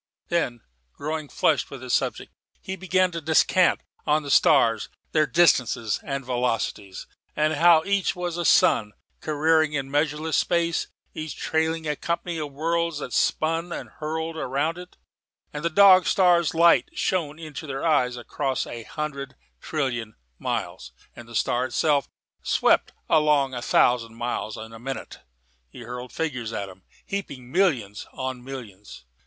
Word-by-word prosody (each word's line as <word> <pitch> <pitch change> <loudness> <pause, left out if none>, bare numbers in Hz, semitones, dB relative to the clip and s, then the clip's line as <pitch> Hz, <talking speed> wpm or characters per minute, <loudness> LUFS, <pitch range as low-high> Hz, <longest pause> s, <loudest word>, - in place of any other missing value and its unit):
Then, 125 -9 -1 0.3
growing 155 0 -4
flushed - - +1
with 135 -2 -9
his 125 - -3
subject, - - -1 0.3
he 190 - -5
began 185 0 +1
to 165 -1 -5
descant 160 +3 +3 0.3
on 150 +1 +2
these 140 - 0
stars, 115 -2 +4 0.2
their 155 -1 +3
distances 125 -10 +2
and 140 -3 -4
velocities; 120 -6 -2 0.3
how 155 +2 +4
that - - -12
each 200 -1 +1
was 175 -1 -3
a 175 - -2
sun, 110 - +4 0.3
careering 155 0 +2
in 135 -2 -3
measureless 150 +2 0
space, 170 -1 +1 0.3
each 155 -1 -6
trailing 160 0 -1
a 150 - 0
company 170 +1 -3
of 150 -2 -4
worlds 165 +2 -1
that 135 -4 -6
spun 165 +2 0
and - - -6
hurtled 160 +1 -3
round 155 +5 -1
it; 180 0 -12 0.5
that 150 - -5
the 170 - 0
Dog 185 0 +7
star's 175 -4 +3
light 170 +1 +5
shone 155 -5 -1
into 155 -3 -8
their 135 +2 -4
eyes 125 -6 +2
across 130 +2 -2
a 120 - -7
hundred 140 +2 -5 0.2
trillion 120 -8 -3 0.2
miles; - - -4 0.2
that 120 - -12
the 115 - -10
star 125 +3 +1
itself 145 -1 +1 0.3
swept - - +2 0.2
along 150 -4 +3
a 120 - -4
thousand 115 -2 +2
miles 120 -2 -3
in 110 +1 -9
a 115 - -10
minute. 135 +3 -6 0.5
He - - -12
hurled 125 +1 -7
figures 125 -8 -3
at 100 -3 -3
them, 95 -1 -14 0.2
heaping 140 -11 -6
millions 130 - 0
on 130 -1 -5
millions. 105 - -10
150 Hz, 150 wpm, -25 LUFS, 125-165 Hz, 0.5 s, Dog